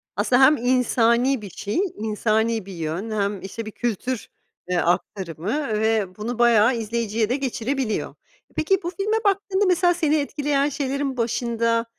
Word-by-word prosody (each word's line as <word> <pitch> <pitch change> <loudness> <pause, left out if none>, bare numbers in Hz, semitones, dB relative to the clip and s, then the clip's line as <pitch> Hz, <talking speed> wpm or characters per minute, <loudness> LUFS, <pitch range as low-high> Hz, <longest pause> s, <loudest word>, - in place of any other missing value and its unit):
Aslında 240 +6 +3
hem 295 +3 +7
insani 245 0 +2
bir 200 - -8
şey, 205 - -3 0.2
insani 220 0 0
bir 195 - -9
yön, 170 +6 -4
hem 200 -2 -1
işte 215 +4 -6
bir 215 - -6
kültür, 240 +1 -3 0.4
eee, 180 - +1
aktarımı 185 - -1
ve 215 -4 0
bunu 235 +3 -4
bayağı 235 0 +5
izleyiciye 225 -1 -1
de 250 - +1
geçirebiliyor. 265 -3 -2 0.4
Peki 385 +5 +2
bu 345 - -2
filme 425 +3 +1
baktığında 400 0 +1
mesela 355 -1 +3
seni 315 -3 +1
etkileyen 290 -1 0
şeylerin 275 -1 -2
başında, 230 0 0
235 Hz, 145 wpm, -23 LUFS, 215-275 Hz, 0.4 s, hem